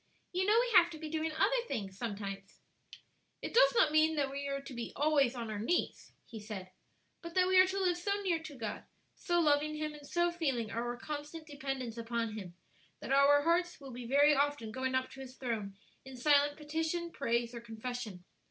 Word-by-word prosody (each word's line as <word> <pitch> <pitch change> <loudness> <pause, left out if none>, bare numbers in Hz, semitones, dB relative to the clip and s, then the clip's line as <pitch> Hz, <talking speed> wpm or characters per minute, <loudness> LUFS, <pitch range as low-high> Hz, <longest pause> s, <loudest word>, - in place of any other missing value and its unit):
"You 370 +2 0
know 430 +2 +5
we 480 -3 0
have 345 -1 +1
to - - -7
be 310 -1 -7
doing 320 0 -1
other 400 +11 +2
things 200 -7 -4
sometimes." 195 -2 -6 0.8
"It - - -6
does - - +6
not 315 -10 +5
mean 310 +1 +4
that 280 -2 0
we 280 0 -4
are 275 0 -2
to 275 -1 -10
be 235 -1 -5
always 285 -4 +3
on 230 -3 -4
our 210 - -4
knees," 345 +12 -1
he 225 - -9
said; 205 -3 -7 0.5
"but 335 0 -9
that 365 0 +4
we 375 0 +5
are 370 - +4
to 385 +1 -2
live 360 -2 +2
so 400 +3 -1
near 345 -4 +1
to 310 -4 -9
God, 220 -3 -5 0.3
so 345 -2 0
loving 305 -1 +2
Him, 305 0 -3
and 295 -1 -12
so 345 +2 +1
feeling 270 -11 -1
our 240 +1 -3
constant 300 +3 -6
dependence 270 -5 -5
upon 230 -1 -2
Him, 190 -5 -8 0.4
that - - -3
our 285 +1 +5
hearts 350 +2 +1
will 275 -2 -10
be 240 -1 -7
very 285 +3 +5
often 285 -5 0
going 260 +2 -2
up 260 0 -1
to 270 - -11
His 260 -1 -9
throne 220 -6 -3 0.3
in 265 -1 -10
silent 290 +2 +3
petition, 320 +3 -2
praise 235 -4 -1
or 235 - -6
confession. 225 -4 -6
280 Hz, 210 wpm, -33 LUFS, 235-320 Hz, 0.8 s, does